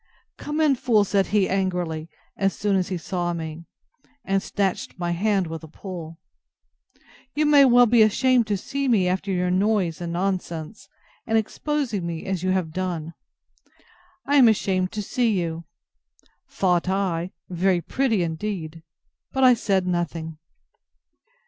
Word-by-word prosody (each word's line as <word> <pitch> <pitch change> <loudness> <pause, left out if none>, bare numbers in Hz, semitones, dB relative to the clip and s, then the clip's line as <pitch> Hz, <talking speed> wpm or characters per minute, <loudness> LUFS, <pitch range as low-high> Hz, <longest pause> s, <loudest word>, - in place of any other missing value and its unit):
Come 295 +1 -4
in, 305 -3 +4
fool, 235 -4 +2
said 195 -1 +1
he, 205 -3 +2
angrily, 180 -4 -2 0.3
as 195 -1 0
soon 205 -1 +1
as 185 -2 +1
he 185 - -3
saw 175 +1 -2
me; 165 0 -6 0.6
(and 195 0 +1
snatched 195 -3 -2
my 175 -1 -2
hand 195 +2 +1
with 165 0 -7
a - - -9
pull;) 165 -1 -8 1.2
you 305 +1 +2
may 290 -2 +7
well 245 -1 +6
be 235 0 +4
ashamed 235 +2 +3
to 205 -2 0
see 275 +8 -3
me, 205 -7 +3
after 190 +2 -1
your 180 -1 0
noise 185 -4 +1
and 170 -1 -4
nonsense, 185 +1 -3 0.4
and 225 0 +2
exposing 230 - -2
me 165 -1 -5
as 190 -3 -2
you 185 - -1
have 185 -4 0
done. 170 -3 -3 1.1
I 285 +1 +3
ashamed 195 -6 +3
to 210 -1 -3
see 225 -2 +1
you! 165 -1 -4 0.8
thought 180 -1 +1
I: 185 -3 -1 0.2
Very 180 0 +1
pretty 225 0 0
indeed!—But 165 +6 -5
I 255 -1 +8
said 195 -5 0
nothing. 165 -3 -3
190 Hz, 145 wpm, -24 LUFS, 170-215 Hz, 1.2 s, I